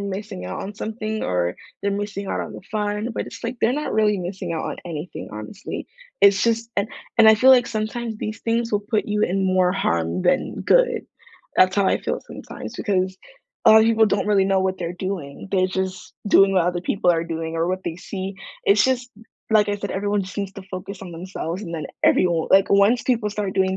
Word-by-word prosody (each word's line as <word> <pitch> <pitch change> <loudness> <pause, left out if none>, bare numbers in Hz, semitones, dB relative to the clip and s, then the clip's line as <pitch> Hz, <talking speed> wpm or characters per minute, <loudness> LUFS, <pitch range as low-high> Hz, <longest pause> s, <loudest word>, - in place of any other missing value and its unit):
missing 200 - -5
out 90 - -5
on 205 - -6
something 215 +1 -4
or 90 0 0 0.3
they're 200 0 0
missing 200 0 -4
out - - -2
on - - -6
the - - -9
fun, 210 +1 -1
but - - -2
it's - - -10
like, 240 +2 -3
they're 235 - +3
not 300 +3 -2
really 210 -2 +2
missing 180 0 -4
out 165 - -3
on - - -4
anything, 165 0 -6
honestly, 110 - -7 0.3
It's 200 0 +6
just 230 0 +1
and 200 +1 +1 0.3
and 220 -1 +8
I 220 - +7
feel 260 +5 +6
like 245 -2 +6
sometimes 225 +1 -3
these 215 +1 -5
things 230 0 -1
will 205 - +2
put 210 +1 -1
you 210 0 0
in 190 -1 +1
more 185 -1 +3
harm 85 - 0
than - - +1
good, - - +3 0.5
that's 185 +1 +4
how 200 -1 +3
I - - +2
feel - - -2
sometimes - - -9
because 190 -3 0 0.5
a - - +8
lot 220 - +9
of 220 - +4
people 225 -1 +4
don't 200 0 0
really 200 -2 +3
know 195 0 +2
what 190 0 0
they're 170 -1 -3
doing, 180 -6 -5
they're 185 -1 +3
just 190 0 -4
doing 195 -1 +6
what 180 -3 +3
other 175 0 0
people 180 0 +2
are 165 -1 0
doing 165 -1 -4
or 165 +1 0
what 185 +1 -2
they 170 - -3
see, 190 +1 -6 0.3
it's 205 +1 +5
just, 255 -1 0 0.4
like 215 -1 +4
I 205 - 0
said, 200 0 -5
everyone 205 0 0
seems 195 +1 -4
to 195 - -8
focus 190 +1 -6
on 180 -3 -8
themselves 175 +1 -5
and 170 -5 -6
then 155 -2 -4 0.2
everyo 170 -3 +3
like, 195 0 +6
once 200 +5 +4
people 230 -5 +1
start 205 -2 -3
doing 190 -1 +2
200 Hz, 220 wpm, -22 LUFS, 185-215 Hz, 0.5 s, lot